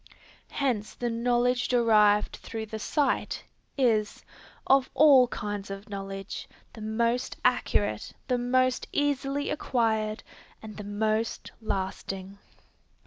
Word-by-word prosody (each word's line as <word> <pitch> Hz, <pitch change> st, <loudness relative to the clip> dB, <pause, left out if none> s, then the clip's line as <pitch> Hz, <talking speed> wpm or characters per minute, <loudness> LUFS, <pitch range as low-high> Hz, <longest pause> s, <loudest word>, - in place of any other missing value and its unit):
Hence 240 Hz, -7 st, -1 dB
the 240 Hz, -1 st, -2 dB
knowledge 245 Hz, +1 st, +1 dB
derived 215 Hz, -4 st, +4 dB
through 225 Hz, -1 st, -6 dB
the 220 Hz, 0 st, -6 dB
sight, 285 Hz, +5 st, 0 dB, 0.3 s
is, 225 Hz, -6 st, +1 dB, 0.4 s
of 270 Hz, -1 st, +4 dB
all 270 Hz, -3 st, +7 dB
kinds 205 Hz, -3 st, -5 dB
of 195 Hz, +1 st, -8 dB
knowledge, 195 Hz, -1 st, -6 dB, 0.2 s
the 220 Hz, -, -10 dB
most 230 Hz, +3 st, -1 dB
accurate, -, -, +1 dB, 0.2 s
the 250 Hz, -1 st, +1 dB
most 255 Hz, +1 st, +1 dB
easily 285 Hz, 0 st, 0 dB
acquired, 220 Hz, -6 st, 0 dB, 0.4 s
and 215 Hz, -1 st, -10 dB
the 210 Hz, -, -6 dB
most 215 Hz, +2 st, -1 dB
lasting. 195 Hz, -1 st, -4 dB
225 Hz, 110 wpm, -28 LUFS, 210-250 Hz, 0.4 s, all